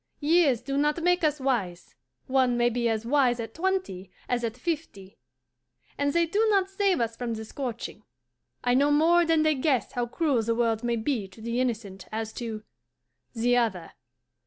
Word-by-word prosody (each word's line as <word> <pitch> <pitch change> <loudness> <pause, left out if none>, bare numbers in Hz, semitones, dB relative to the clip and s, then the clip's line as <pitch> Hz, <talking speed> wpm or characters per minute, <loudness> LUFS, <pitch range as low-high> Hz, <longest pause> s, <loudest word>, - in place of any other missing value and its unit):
Years 300 -5 +3
do 275 0 -1
not 300 +3 +1
make 355 0 +2
us 300 -1 +1
wise; 215 -10 -2 0.3
one 255 -2 +2
may 240 0 +3
be 235 0 0
as 220 0 -2
wise 250 -2 +2
at 225 - -5
twenty 330 - -2 0.2
as 245 -1 -1
at 230 0 -3
fifty. 250 - -5 0.8
And 285 0 0
they 340 +2 +2
do 405 +7 +1
not 390 -2 +2
save 390 -2 +1
us 230 -1 -1
from 235 -1 -3
the 220 0 -6
scorching. 235 -4 -6 0.6
I 245 - +2
know 280 +3 +4
more 330 +4 +4
than 325 -1 +3
they 310 0 +3
guess 265 -2 0
how 240 -1 -2
cruel 280 -2 +1
the 230 +1 -1
world 230 -1 0
may 240 0 0
be 225 -3 -2
to 190 +3 -17
the 235 +2 -2
innocent 215 -6 -3
as 220 0 -4
to 220 -2 -5 0.7
the 240 +2 +2
other. 195 -9 -1
245 Hz, 180 wpm, -27 LUFS, 225-305 Hz, 0.8 s, know